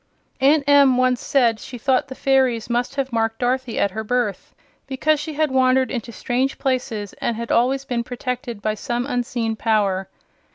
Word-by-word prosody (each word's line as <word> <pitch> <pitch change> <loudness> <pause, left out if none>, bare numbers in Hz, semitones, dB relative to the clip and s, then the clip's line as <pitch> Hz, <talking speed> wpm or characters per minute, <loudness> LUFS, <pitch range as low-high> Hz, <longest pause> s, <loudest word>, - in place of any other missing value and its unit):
Aunt 280 +2 +4
Em 280 -3 +6
once 255 -1 +2
said 235 -5 +2
she 255 +2 -8
thought 260 +2 +1
the 265 - -8
fairies 260 -4 +1
must 245 +3 -1
have 270 -3 -2
marked 225 0 0
Dorothy 250 -1 -1
at 200 - +1
her 220 +3 -4
birth, 235 -3 -2 0.3
because 295 +3 +1
she 300 +1 -5
had 310 -1 +1
wandered 260 0 +3
into 235 -2 -4
strange 255 +4 -1
places 250 -6 -2
and 235 - 0
had 235 0 -4
always 260 +3 +2
been 245 -3 -2
protected 245 -2 -5
by 215 - +1
some 240 +3 -3
unseen 245 -3 -2
power. 200 -4 0
250 Hz, 175 wpm, -21 LUFS, 230-265 Hz, 0.3 s, Em